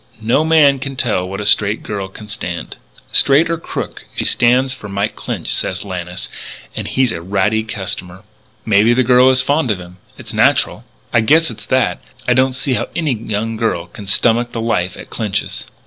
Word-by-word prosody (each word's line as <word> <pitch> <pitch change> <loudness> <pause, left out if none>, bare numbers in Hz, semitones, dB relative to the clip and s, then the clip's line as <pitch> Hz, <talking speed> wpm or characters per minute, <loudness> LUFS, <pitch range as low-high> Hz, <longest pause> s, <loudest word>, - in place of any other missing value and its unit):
"No 115 +7 +2
man 155 -4 +4
can 135 0 -5
tell 90 -8 0
what 100 - -5
a - - -4
straight 105 +1 +3
girl 100 -2 -4
can 105 +3 -12
stand." 90 -6 -5 0.4
"Straight 145 +4 +4
or 165 - -1
crooked - - -6
she - - -1
stands 125 +2 +3
for 100 - -9
Mike 100 +2 -2
Clinch," - - -4
said 95 +1 -1
Lannis, 90 -2 -5 0.5
"and - - -4
he's 130 -3 +1
a 85 - -5
ratty 100 +4 +1
customer." 95 -3 -5 0.4
"Maybe 110 +2 +4
the 130 - +3
girl 125 +1 +5
is 130 0 +3
fond 145 -2 +1
of 105 -4 0
him. 90 0 -12 0.2
It's - - -7
natural." - - +2 0.3
"I 120 - +5
guess 160 +8 +4
it's - - -11
that. 130 -1 +1 0.2
But - - +1
I - - +6
don't 130 +1 +3
see 130 +1 0
how - - -1
any 155 -5 0
young 110 0 -3
girl 110 -7 -1
can 100 +3 -11
stomach 120 +4 +2
the 115 - -3
life 95 -6 -1
at - - -11
Clinch's." 105 -4 -2
110 Hz, 195 wpm, -17 LUFS, 100-130 Hz, 0.5 s, I